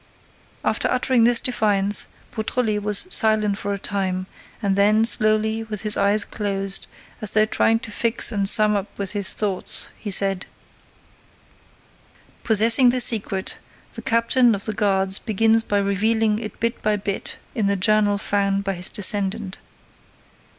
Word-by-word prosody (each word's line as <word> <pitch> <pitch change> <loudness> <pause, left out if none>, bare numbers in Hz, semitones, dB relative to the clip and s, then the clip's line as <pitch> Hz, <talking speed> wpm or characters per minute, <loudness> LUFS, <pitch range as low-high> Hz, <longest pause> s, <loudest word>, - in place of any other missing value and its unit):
After - - -1
uttering 255 -2 +1
this 240 -1 +4
defiance, 205 -4 +1 0.2
Beautrelet 220 -1 -3
was 205 - +2
silent 215 - +3
for 205 - -5
a 200 - -3
time 190 -2 -4 0.3
and 200 -3 -1
then, 210 +3 +2
slowly, 220 -1 +1
with 215 -2 -7
his 210 -1 +2
eyes 200 +1 +1
closed, 195 -2 0 0.3
as 215 - +3
though 215 +2 +2
trying 225 +1 0
to 225 - -10
fix 230 +2 +1
and 200 -3 +1
sum 210 0 +4
up 200 0 -3
his 200 0 0
thoughts, 200 -3 -3
he 210 - -7
said: 195 -1 +1 1.9
"Possessing 225 +3 +5
the 250 +1 +2
secret, 200 -5 0 0.3
the - - -9
captain 230 0 +1
of 200 - -7
the 215 - -2
guards 195 -2 0
begins 225 +1 +1
by 205 -2 -3
revealing 210 +2 0
it 215 -2 -8
bit 230 +1 -3
by 215 0 0
bit 200 -1 -4 0.2
in 220 -6 -2
the 200 - 0
journal 205 +1 +1
found 200 0 -1
by 195 0 -3
his 180 0 -2
descendant. 200 0 +1
210 Hz, 150 wpm, -20 LUFS, 200-220 Hz, 1.9 s, Possessing